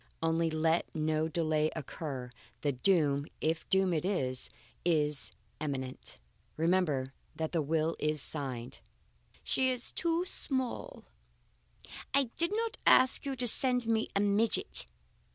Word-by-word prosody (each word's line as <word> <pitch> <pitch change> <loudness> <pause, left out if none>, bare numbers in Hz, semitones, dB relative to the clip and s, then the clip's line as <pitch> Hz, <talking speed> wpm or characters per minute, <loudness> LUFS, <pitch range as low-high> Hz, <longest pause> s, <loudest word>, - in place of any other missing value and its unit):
Only, 165 0 +1
let 160 +1 +1
no 155 0 0
delay 155 -1 0
occur. 135 -4 -6 0.3
The 145 - +1
doom, 145 -1 +2
if 160 +1 -2
doom 190 -1 +2
it 155 - -1
is, 130 -10 0 0.3
is 150 -5 +1 0.3
immanent. 135 -4 -5 0.4
Remember 155 -6 +1 0.2
that 160 -1 -3
the 165 - 0
will 160 +2 0
is 150 0 0
signed. 130 -4 +2 0.6
"She 260 0 +1
is 250 -1 -3
too 335 +1 0
small; 265 - -4 1.1
I 275 -4 +2
did 335 +1 +2
not 450 +2 -2
ask 260 +2 +5
you 270 - -2
to 250 0 -1
send 250 +1 +5
me 225 -1 0
a - - +3
midget." 205 - +2
160 Hz, 130 wpm, -31 LUFS, 150-225 Hz, 1.1 s, ask